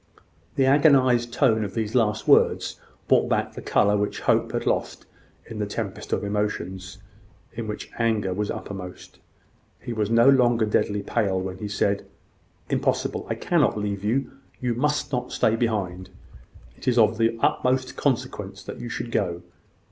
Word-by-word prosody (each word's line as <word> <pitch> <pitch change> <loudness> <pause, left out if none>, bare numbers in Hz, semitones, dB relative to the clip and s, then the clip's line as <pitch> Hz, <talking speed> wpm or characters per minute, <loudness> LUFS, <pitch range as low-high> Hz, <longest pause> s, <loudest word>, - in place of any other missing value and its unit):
The 135 - +3
agonised 130 -4 +4
tone 115 -4 +2
of 100 -2 -6
these 110 -1 -2
last 110 -3 +1
words - - +3 0.3
brought - - +3
back - - 0
the - - -8
colour 105 0 +2
which 105 0 -2
Hope - - +2
had - - -2
lost - - -1 0.4
in 110 - -8
the 105 - -1
tempest 105 0 -5
of - - 0
emotions, 100 -2 -3 0.6
in 115 -1 -5
which 105 - -6
anger 110 -5 +1
was 105 +2 -2
uppermost. 90 -2 -7 0.6
He 120 - -6
was 105 -2 -1
no 115 +2 +5
longer 120 -4 +4
deadly 105 -1 0
pale 100 -3 0
when 95 0 -5
he 105 - -4
said: 100 0 0 0.6
"Impossible. - - -1
I - - -1
cannot - - +1
leave 100 -1 -3
you. 125 +6 0 0.3
You 125 -1 -1
must 145 +4 0
not 125 -2 -2
stay 110 - +2
behind. 95 -6 -2 0.7
It - - -13
is 125 -1 +2
of 110 0 +4
the 115 0 +2
utmost 130 +2 +1
consequence 135 -5 -2
that - - -8
you 120 - -6
should 115 - -5
go. 90 -5 -1
110 Hz, 165 wpm, -24 LUFS, 100-120 Hz, 0.7 s, no